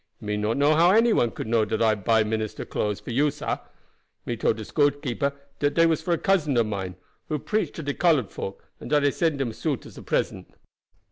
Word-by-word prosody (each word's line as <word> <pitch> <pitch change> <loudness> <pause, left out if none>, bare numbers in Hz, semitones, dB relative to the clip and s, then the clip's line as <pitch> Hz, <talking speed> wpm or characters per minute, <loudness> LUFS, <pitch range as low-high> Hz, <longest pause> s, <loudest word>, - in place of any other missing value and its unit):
Me 105 -1 -3
not 105 +3 -1
know 145 +2 +4
how 165 +3 +5
any 225 +4 +5
one 120 - +3
could - - -6
know 110 0 +2
dat 110 +1 -2
I 110 -1 +4
buy 110 +2 +2
dat 105 - -4
minister 110 -1 -3
clothes 105 -1 -2
for - - -8
you, 145 +5 +3
sah. 150 +1 -3 0.7
Me 120 - -2
told 110 0 +1
de 110 - -6
storekeeper 140 -1 0 0.3
dat 145 0 +1
dey 165 - +5
was 160 -2 +2
for 170 +1 0
cousin 155 -10 +1
of 115 - +4
mine, 95 -4 -4 0.3
who 155 - -1
preach 215 +9 -1
to 160 - -6
de 145 0 -2
colored 150 - +2
folk, 95 - -7
and - - -8
dat 150 -1 +3
I 140 - +4
send 160 -3 0
him 120 -5 -1
suit - - -3
as - - -11
present. - - -2
140 Hz, 225 wpm, -25 LUFS, 110-155 Hz, 0.7 s, how